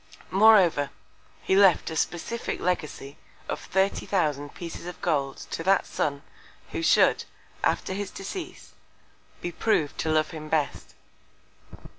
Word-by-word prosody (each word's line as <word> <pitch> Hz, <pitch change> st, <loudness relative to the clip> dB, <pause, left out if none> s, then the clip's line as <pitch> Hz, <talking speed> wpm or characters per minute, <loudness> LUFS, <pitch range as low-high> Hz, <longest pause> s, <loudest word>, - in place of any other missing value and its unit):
Moreover, 190 Hz, -8 st, +5 dB, 0.5 s
he 190 Hz, -, +2 dB
left 195 Hz, -4 st, +5 dB
a -, -, -4 dB
specific 175 Hz, +8 st, -2 dB
Legacy 150 Hz, -5 st, -3 dB, 0.3 s
of -, -, -3 dB
30,000 170 Hz, -7 st, 0 dB
Pieces 170 Hz, 0 st, -7 dB
of 180 Hz, -, -8 dB
Gold 140 Hz, -5 st, 0 dB
to -, -, -3 dB
that 190 Hz, +3 st, +3 dB
Son, 140 Hz, -1 st, -2 dB, 0.5 s
who -, -, -3 dB
should, -, -, +4 dB, 0.4 s
after -, -, 0 dB
his 200 Hz, 0 st, -4 dB
Decease, 325 Hz, -, -8 dB, 0.7 s
be 175 Hz, -, -3 dB
prov'd 160 Hz, -5 st, 0 dB
to 160 Hz, -, -1 dB
love 155 Hz, 0 st, +2 dB
him 155 Hz, -1 st, -8 dB
best. 150 Hz, -3 st, -2 dB
170 Hz, 125 wpm, -26 LUFS, 150-195 Hz, 0.7 s, Moreover